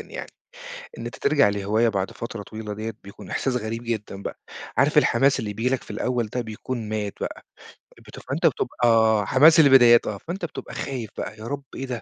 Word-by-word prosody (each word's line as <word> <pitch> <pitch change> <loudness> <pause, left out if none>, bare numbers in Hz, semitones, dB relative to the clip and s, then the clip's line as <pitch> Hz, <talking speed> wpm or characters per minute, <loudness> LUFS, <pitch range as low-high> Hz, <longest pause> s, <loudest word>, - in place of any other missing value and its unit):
يعني. - - -8 0.7
إن - - -6
أنت - - -6
ترجع 420 - +3
لهواية 105 +3 +1
بعد 95 -3 -1
فترة 115 -2 -7
طويلة 110 0 -7
ديَّة، 110 +2 -5
بيكون 100 - -12
إحساس 130 -2 -1
غريب 115 0 -4
جدًا 105 -4 -4
بقى. - - -6 0.4
عارف - - +4
الحماس 135 0 +3
اللي 105 -3 -4
بييجي 120 +5 0
لك 130 - -4
في - - -16
الأول 120 +2 -1
ده 125 +4 -3
بيكون 115 0 -5
مات 105 -2 -2
بقى. - - -5 0.7
بت - - -10
فأنت - - -3
بتبقى 110 -3 +3
حماس 155 +5 +6
البدايات 130 -5 +7
آه. 105 - -3
فأنت 175 - -5
بتبقى 165 - -8
خايف 125 -6 -4
بقى، 110 - -5
يا 110 - -10
رب 140 +1 -4
إيه 135 - -4
ده؟ 125 -3 -5
115 Hz, 195 wpm, -24 LUFS, 105-130 Hz, 0.7 s, البدايات